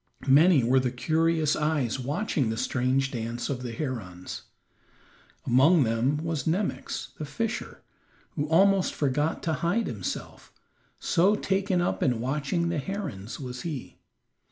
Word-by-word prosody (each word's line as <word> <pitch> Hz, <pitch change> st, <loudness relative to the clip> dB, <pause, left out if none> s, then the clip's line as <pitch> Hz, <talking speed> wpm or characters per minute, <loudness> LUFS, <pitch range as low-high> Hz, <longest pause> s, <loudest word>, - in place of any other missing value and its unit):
Many 145 Hz, +1 st, +6 dB
were 130 Hz, +3 st, +4 dB
the 130 Hz, -1 st, 0 dB
curious 160 Hz, +4 st, +1 dB
eyes 150 Hz, -6 st, 0 dB
watching 145 Hz, -, -1 dB
the 110 Hz, -, -2 dB
strange 130 Hz, +3 st, 0 dB
dance 115 Hz, 0 st, -4 dB
of 125 Hz, -2 st, -3 dB
the 125 Hz, -2 st, -5 dB
herons. 110 Hz, -, -5 dB, 1.0 s
Among 140 Hz, +6 st, +5 dB
them 115 Hz, +5 st, +1 dB
was 160 Hz, -3 st, -3 dB
Nemox, 185 Hz, +5 st, -2 dB
the -, -, -3 dB
fisher, 225 Hz, +9 st, -4 dB, 0.5 s
who 145 Hz, 0 st, -2 dB
almost 190 Hz, +4 st, +3 dB
forgot 145 Hz, +2 st, 0 dB
to 160 Hz, -, 0 dB
hide 175 Hz, -, 0 dB
himself, 100 Hz, -6 st, -6 dB, 0.5 s
so 190 Hz, +5 st, +3 dB
taken 190 Hz, -2 st, 0 dB
up 175 Hz, -, -1 dB
in 125 Hz, -4 st, +1 dB
watching 150 Hz, +7 st, -1 dB
the 170 Hz, -3 st, -1 dB
herons 140 Hz, -, -5 dB
was 125 Hz, -2 st, -6 dB
he. 155 Hz, -7 st, -6 dB
145 Hz, 135 wpm, -27 LUFS, 125-170 Hz, 1.0 s, Many